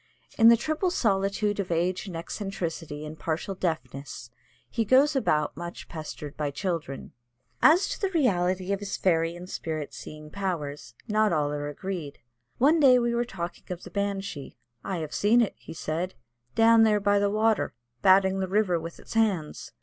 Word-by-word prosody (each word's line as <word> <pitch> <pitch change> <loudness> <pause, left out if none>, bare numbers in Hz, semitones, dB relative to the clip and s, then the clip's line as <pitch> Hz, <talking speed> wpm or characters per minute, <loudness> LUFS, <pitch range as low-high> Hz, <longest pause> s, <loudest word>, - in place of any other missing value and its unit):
In 225 0 +7
the 235 - +7
triple 310 - 0
solitude 205 - 0
of 195 - -2
age 175 +4 0
and 180 - -6
eccentricity 165 -4 -5
and 155 +1 -8
partial 165 +4 -2
deafness 135 -8 -4 0.4
he 230 - -1
goes 265 +7 +4
about 150 - +1
much 170 +2 -7
pestered 155 -2 -7
by 150 -1 -1
children. 155 -3 -4 0.5
As 355 +6 +6
to - - -5
the 390 - +1
reality 190 - +1
of 200 - -2
his 200 -1 -4
fairy 165 -2 +1
and 175 +1 -9
spirit 155 -5 -4
seeing 150 0 -10
powers, 150 -10 -4
not 215 0 +2
all 150 -3 +1
are 145 0 -3
agreed. 155 -1 -5 0.4
One 300 +6 +4
day 260 -4 +7
we 240 -1 +1
were 240 +1 +1
talking 175 -6 -6
of 180 -1 -5
the 180 - -10
Banshee. 195 -7 -3 0.3
"I 190 -2 -3
have 155 -2 -5
seen 220 +4 +4
it," 235 - +2
he - - -10
said, 165 +4 -3 0.4
"down 225 0 +6
there 215 -2 +4
by 205 0 +3
the 200 0 +2
water 215 - +1 0.3
'batting' 190 0 +5
the 190 - -1
river 190 -3 +2
with 165 +1 -8
its - - -10
hands." 200 -9 0
185 Hz, 175 wpm, -27 LUFS, 160-215 Hz, 0.5 s, In